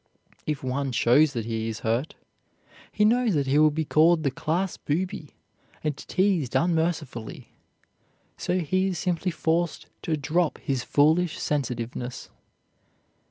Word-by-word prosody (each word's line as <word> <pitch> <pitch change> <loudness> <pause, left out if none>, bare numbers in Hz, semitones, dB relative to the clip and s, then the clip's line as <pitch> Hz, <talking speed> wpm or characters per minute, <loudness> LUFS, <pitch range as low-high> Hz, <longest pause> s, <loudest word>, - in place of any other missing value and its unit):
If 150 -3 -2
one 135 +1 -1
shows 140 +5 +4
that 115 -4 -3
he 115 -1 -2
is 110 - -6
hurt, 115 +7 -1 0.8
he 210 - +2
knows 235 -3 +3
that 140 -2 +1
he 135 +3 +3
will 155 0 +6
be 155 +1 -2
called 160 +2 +4
the 140 - +1
class 170 +8 -1
booby, 170 0 -3 0.5
and 150 -2 -1
teased 180 -7 0
unmercifully, 160 -9 -1 0.9
so 180 - -1
he 185 +4 +1
is 185 -2 -2
simply 180 +1 -1
forced 170 0 -1 0.2
to 160 -2 -1
drop 160 +4 0
his 135 -3 -2
foolish 160 +4 +3
sensitiveness. 125 -3 -3
155 Hz, 135 wpm, -26 LUFS, 135-175 Hz, 0.9 s, will